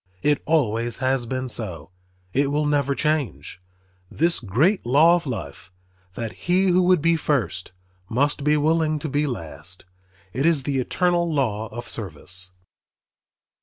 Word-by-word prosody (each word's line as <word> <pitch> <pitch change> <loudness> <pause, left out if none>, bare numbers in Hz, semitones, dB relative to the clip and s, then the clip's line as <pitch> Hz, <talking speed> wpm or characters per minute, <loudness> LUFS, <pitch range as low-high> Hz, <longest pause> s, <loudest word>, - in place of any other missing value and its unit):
It 145 -1 +2
always 120 -7 +1
has 130 -2 0
been 130 +1 -3
so, 90 -10 -3 0.4
it 140 +1 +2
will 150 +1 +1
never 145 -2 +1
change, 150 -11 -2 0.5
this 170 +2 0
great 140 - +1
law 145 +8 +5
of 170 -4 -3
life, 85 - -6 0.4
that 115 -2 -4
he 185 +2 +1
who 180 +1 +4
would 180 -3 +3
be 170 0 +4
first 120 - -1 0.4
must 140 +5 0
be 150 +1 +3
willing 155 +1 +2
to 150 - -4
be 145 +1 0
last. 85 - -7 0.5
It 135 +6 +1
is 160 -5 +2
the 135 -1 -1
eternal 175 +5 +1
law 115 -7 -1
of 120 +3 -8
service. 90 -2 -2
140 Hz, 145 wpm, -23 LUFS, 110-155 Hz, 0.5 s, law